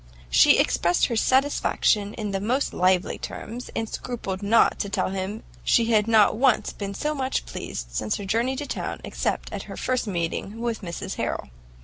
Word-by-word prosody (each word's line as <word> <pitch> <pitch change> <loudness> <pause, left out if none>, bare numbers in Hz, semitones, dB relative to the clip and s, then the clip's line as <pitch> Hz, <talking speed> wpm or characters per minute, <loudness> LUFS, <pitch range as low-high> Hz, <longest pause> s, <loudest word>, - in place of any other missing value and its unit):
She - - +7
expressed 175 +1 +2
her 235 - -2
satisfaction 225 -5 +2
in 210 -3 -3
the 195 - -1
most 250 +7 0
lively 185 0 +2
terms, 240 +4 -7
and 225 - -1
scrupled 215 -5 -5
not 210 +3 +4
to 200 - -2
tell 195 - -1
him 195 +3 -4 0.2
she 230 0 +3
had 215 -1 +3
not 220 -3 +5
once 255 +1 +2
been 200 -1 -5
so 300 +8 -1
much 265 -2 -1
pleased - - -6
since 105 - -1
her 205 - -5
journey 235 +6 +1
to 290 +2 -4
town, - - -4
except - - -2
at - - -3
her - - -7
first 255 -2 -1
meeting 190 +3 -3
with 235 -2 -2
Mrs 170 -4 -5
Harrel. 65 - -3
215 Hz, 185 wpm, -25 LUFS, 195-240 Hz, 0.2 s, She